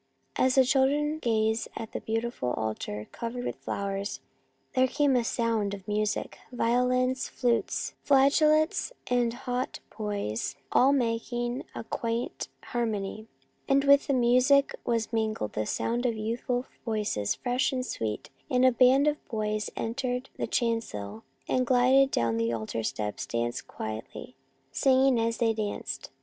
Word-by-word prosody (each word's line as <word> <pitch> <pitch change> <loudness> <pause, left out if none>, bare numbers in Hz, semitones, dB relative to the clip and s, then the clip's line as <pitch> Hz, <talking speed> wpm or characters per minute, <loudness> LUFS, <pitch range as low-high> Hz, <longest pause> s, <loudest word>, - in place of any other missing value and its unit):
As 255 0 +3
the 265 -1 +6
children 290 +4 +2
gazed 220 -3 +1
at 225 - -6
the - - -4
beautiful 225 - -2
altar 105 -1 -4
covered 245 +1 -5
with - - -3
flowers, 200 0 -3 0.5
there 260 -1 +4
came 280 +1 +2
the 245 -2 +3
sound 225 -3 0
of 195 -1 -14
music, 210 0 -1
— - - -29
violins, 250 +2 +1
flutes, 240 -2 0
flageolets, 305 - +3 0.2
and 245 -1 +3
haut 250 +1 -3 0.2
boys 200 - -3 0.2
all 265 +2 +5
making 240 -1 -1
a - - -4
quaint 230 +1 -3 0.2
harmony, 220 -2 -3 0.2
— - - -26
and 275 0 +4
with 280 0 +5
the 280 - +2
music 255 +3 +4
was 230 -1 -1
mingled 220 - -1
the 110 0 -2
sound 240 +2 0
of 230 -2 -1
youthful 240 +3 -2 0.2
voices, 210 - -1
fresh 250 +1 0
and 255 -1 -2
sweet, 110 - -4 0.2
and 255 0 +3
a 255 - +7
band 255 +3 +5
of 300 0 0
boys 215 -1 -2
entered 250 +2 -3
the - - -3
chancel, 110 - -2 0.3
and 255 -1 +1
gliding 260 +2 +5
down 115 - 0
the 115 0 +1
altar 115 0 -3
steps 105 -1 -3
danced 120 0 -2
quietly, 110 +3 -7 0.4
singing 265 - +4
as 230 0 0
they 230 -2 +2
danced. 215 -2 -4
235 Hz, 145 wpm, -28 LUFS, 210-255 Hz, 0.5 s, a